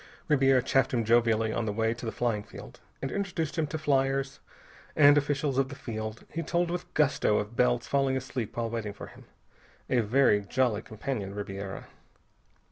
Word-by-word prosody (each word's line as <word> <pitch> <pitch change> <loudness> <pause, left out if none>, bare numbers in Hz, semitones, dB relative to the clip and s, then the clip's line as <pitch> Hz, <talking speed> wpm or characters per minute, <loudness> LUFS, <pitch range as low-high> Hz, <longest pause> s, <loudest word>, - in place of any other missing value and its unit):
Ribiera 135 -3 +4
chaffed 135 -1 +2
him 115 -2 0
jovially 115 -1 +3
on 115 -1 -1
the - - 0
way 110 +2 0
to 120 0 -7
the - - -2
flying 115 -4 -1
field. - - -12 0.2
And 135 - -2
introducing 175 -5 -2
him 155 - -1
to 155 - -4
fliers 135 -2 0 0.6
and 145 -1 +7
officials 140 -1 0
of 135 -1 +1
the 140 - -7
field, 110 -3 -6
he 165 - -2
told 170 +2 0
with 175 0 -5
gusto 140 -8 +2
of 105 +3 -3
Bell's 125 -1 +2
falling 135 -1 +1
asleep 125 -4 -5
while 115 -1 -1
waiting 110 -3 -3
for 100 - -9
him. - - -15 0.7
A 125 - +4
very 115 -1 +3
jolly 110 +1 0
companion, 110 -3 -5
Ribiera. 100 -1 -6
125 Hz, 180 wpm, -28 LUFS, 110-140 Hz, 0.7 s, and